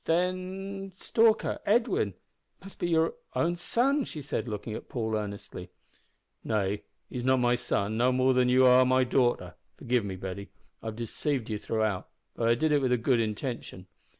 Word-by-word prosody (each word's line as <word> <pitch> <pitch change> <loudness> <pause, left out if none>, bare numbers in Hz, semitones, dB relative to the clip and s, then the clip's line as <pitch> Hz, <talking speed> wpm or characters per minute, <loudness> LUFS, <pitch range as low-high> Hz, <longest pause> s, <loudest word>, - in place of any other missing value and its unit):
"Then 185 +3 -2
Stalker 225 +3 +2
Edwin 210 - +1 0.4
must 195 +1 -13
be 175 - -1
your 160 -1 +2 0.2
own 170 +1 +1
son!" 265 +11 +1
she 150 - -7
said, 135 - -3
looking 105 0 -5
at - - -8
Paul 110 -3 -2
earnestly. 100 -3 -5 0.7
"Nay, 105 -2 0 0.3
he's 125 - -5
not 130 +1 +4
my 120 -1 +3
son, 110 -3 -1
no 125 +2 +3
more 130 +1 +3
than 125 -1 +3
you 130 +1 +5
are 125 0 +7
my 130 0 +3
daughter. 125 -1 +1 0.2
Forgive 120 -1 0
me, 95 -2 -4
Betty. 95 +1 -6 0.3
I've 110 -1 -5
deceived 120 +2 -2
you 105 - -2
throughout, 110 -4 -1 0.3
but 115 -1 +1
I 115 - +5
did 155 +6 +1
it 145 -1 +3
with 130 -2 +1
a 125 - +4
good 120 +1 +2
intention. 110 -3 -4
125 Hz, 175 wpm, -29 LUFS, 110-160 Hz, 0.7 s, are